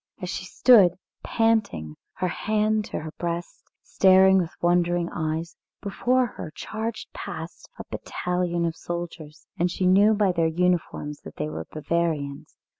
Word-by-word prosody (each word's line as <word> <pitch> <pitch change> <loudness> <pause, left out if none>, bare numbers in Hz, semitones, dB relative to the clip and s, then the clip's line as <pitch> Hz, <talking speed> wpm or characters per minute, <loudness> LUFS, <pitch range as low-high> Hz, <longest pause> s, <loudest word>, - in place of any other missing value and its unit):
As 180 -2 -4
she 190 - -4
stood, 205 -4 +6 0.3
panting, 215 - 0 0.2
her 185 - -2
hands 215 +3 0
to - - -4
her 155 0 -7
breast, 170 0 -4 0.2
staring 190 0 +5
with 170 -3 -1
wondering 175 0 +2
eyes, 160 +1 -3 0.2
before 250 +5 +1
her 205 -8 -8
charged 220 +1 -5
past - - -8
a - - -6
battalion 180 -1 -2
of 165 -1 -2
soldiers, 170 -3 -7
and 175 +1 +2
she 185 +1 -2
knew 200 +4 +5
by 205 -2 +3
their 165 -2 +1
uniforms 165 -3 -1
that - - -11
they 75 - -3
were 80 +1 -6
Bavarians. 155 -3 -2
175 Hz, 145 wpm, -25 LUFS, 165-200 Hz, 0.3 s, stood